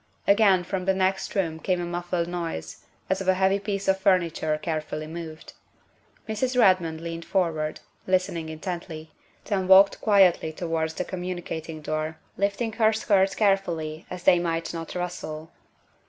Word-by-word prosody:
Again 200 -3 +5
from 185 0 -3
the 190 0 +2
next 190 +2 0
room 165 -5 -1
came 180 +1 0
a 175 - -2
muffled 175 0 -2
noise, 170 - -5 0.2
as 190 0 0
of 190 - -5
a 185 - +4
heavy 190 +1 +2
piece 200 -1 -3
of 190 0 +3
furniture 170 -5 +1
carefully 155 -1 -4
moved. 160 0 -8 0.7
Mrs. 250 +4 0
Redmond 180 -7 +3
leaned 165 0 -5
forward, 160 -5 -1 0.3
listening 185 -3 0
intently, 160 -1 -6 0.3
then 195 -3 -1
walked 195 +1 +7
quietly 190 -6 +4
towards 160 -1 -2
the 180 - -2
communicating 175 -3 -5
door, 155 +1 -3 0.2
lifting 200 +4 -1
her 220 -1 +3
skirts 195 -3 +2
carefully 170 -6 0
that 180 0 -8
they 175 - +6
might 165 -1 -2
not 165 0 -6
rustle. 170 -3 -5
175 Hz, 150 wpm, -26 LUFS, 160-195 Hz, 0.7 s, walked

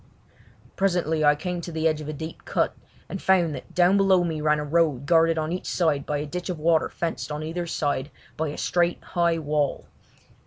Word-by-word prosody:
Presently 175 -5 +1
I 150 0 +5
came 175 +3 -4
to 170 - -7
the 160 0 +1
edge 155 -1 0
of 150 - -6
a - - -3
deep 160 +2 -7
cut, - - 0 0.3
and 195 - -6
found 175 -5 +3
that - - -9
down 180 +2 +5
below 190 -2 +4
me 160 -3 -2
ran 150 0 +3
a 150 - -2
road 150 -4 +1
guarded 165 0 +4
on 155 0 -1
each 180 - -4
side 155 -5 0
by 150 - 0
a 145 - -3
ditch 180 +5 -5
of 180 - -2
water 160 +1 +2
fenced 165 -2 -4
on 150 +1 -4
either 170 +2 -4
side 145 -3 -1 0.3
by 160 +1 -1
a 145 - -5
straight, 175 0 0
high 170 -2 +1
wall. 150 -2 -1
160 Hz, 210 wpm, -25 LUFS, 150-175 Hz, 0.3 s, I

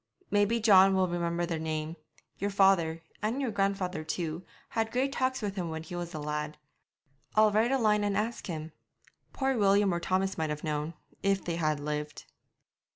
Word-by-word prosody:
'Maybe 205 +3 +3
John 195 -3 +6
will 190 -1 +3
remember 170 0 -1
the 165 -2 -3
name; 155 0 -3 0.4
your 200 - 0
father, 190 -5 +3 0.2
and 220 +6 -1
your 265 -4 -1
grandfather 195 -5 -1
too, 160 +1 -3 0.3
had 225 0 -1
great 260 +3 +1
talks 260 -3 -1
with 200 -1 -2
him 180 -4 -3
when 160 0 -5
he 175 +2 -8
was 175 0 -5
a - - -3
lad. 150 0 -3 0.8
I'll 215 0 +6
write 220 +4 +2
a 270 - +3
line 210 -3 +3
and 200 -1 0
ask 225 +3 -2
him. 160 -2 -5 0.6
Poor 270 -1 0
William 200 -3 +4
or 170 - 0
Thomas 190 +1 0
might 160 -1 0
have 150 0 -4
known, 150 +1 -2 0.3
if 195 -1 +1
they 170 -1 -2
had 155 -3 0
lived.' 150 0 -4
185 Hz, 185 wpm, -30 LUFS, 160-205 Hz, 0.8 s, John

